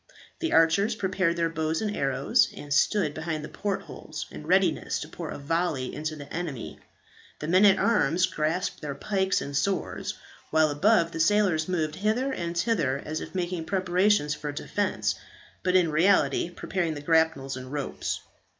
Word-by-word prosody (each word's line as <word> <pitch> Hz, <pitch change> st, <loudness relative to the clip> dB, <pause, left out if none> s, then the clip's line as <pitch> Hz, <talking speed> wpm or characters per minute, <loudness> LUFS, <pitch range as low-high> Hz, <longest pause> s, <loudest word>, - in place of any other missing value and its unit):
The 330 Hz, -1 st, -1 dB
archers 200 Hz, +7 st, +4 dB
prepared 185 Hz, -4 st, 0 dB
their 170 Hz, -1 st, +1 dB
bows 160 Hz, 0 st, -1 dB
and 210 Hz, -1 st, -2 dB
arrows, 135 Hz, -3 st, +2 dB
and 145 Hz, -1 st, -4 dB
stood 160 Hz, 0 st, +2 dB
behind 160 Hz, -1 st, -4 dB
the -, -, -9 dB
port 200 Hz, -1 st, -3 dB
holes -, -, -7 dB
in -, -, -9 dB
readiness -, -, +2 dB
to -, -, -5 dB
pour -, -, -7 dB
a -, -, -5 dB
volley 150 Hz, -3 st, -1 dB
into 155 Hz, +1 st, -4 dB
the 145 Hz, -1 st, -10 dB
enemy; 160 Hz, -8 st, -5 dB, 0.6 s
the 150 Hz, -, -5 dB
men 185 Hz, +5 st, +5 dB
at 195 Hz, -1 st, +6 dB
arms 180 Hz, -6 st, +3 dB
grasped 165 Hz, +1 st, -2 dB
their 145 Hz, -3 st, -4 dB
pikes 190 Hz, +4 st, 0 dB
and 140 Hz, 0 st, -5 dB
swords; 195 Hz, +6 st, -1 dB, 0.3 s
while 155 Hz, -1 st, +3 dB
above, 170 Hz, +2 st, +3 dB
the 165 Hz, -, -5 dB
sailors 175 Hz, -3 st, +3 dB
moved 160 Hz, -4 st, 0 dB
hither 235 Hz, +7 st, 0 dB
and 170 Hz, -5 st, -4 dB
thither 170 Hz, -, +1 dB
as 155 Hz, +1 st, -3 dB
if -, -, -8 dB
making 175 Hz, -2 st, -2 dB
preparations 185 Hz, -3 st, +2 dB
for 150 Hz, -1 st, -5 dB
defence, 145 Hz, -, -1 dB, 0.5 s
but 180 Hz, 0 st, +1 dB
in 175 Hz, -4 st, +4 dB
reality 160 Hz, -2 st, +3 dB
preparing 175 Hz, -2 st, -2 dB
the 145 Hz, -, -6 dB
grapnels 160 Hz, -4 st, +2 dB
and 130 Hz, 0 st, -8 dB
ropes. 145 Hz, -2 st, -3 dB
165 Hz, 170 wpm, -27 LUFS, 150-190 Hz, 0.6 s, at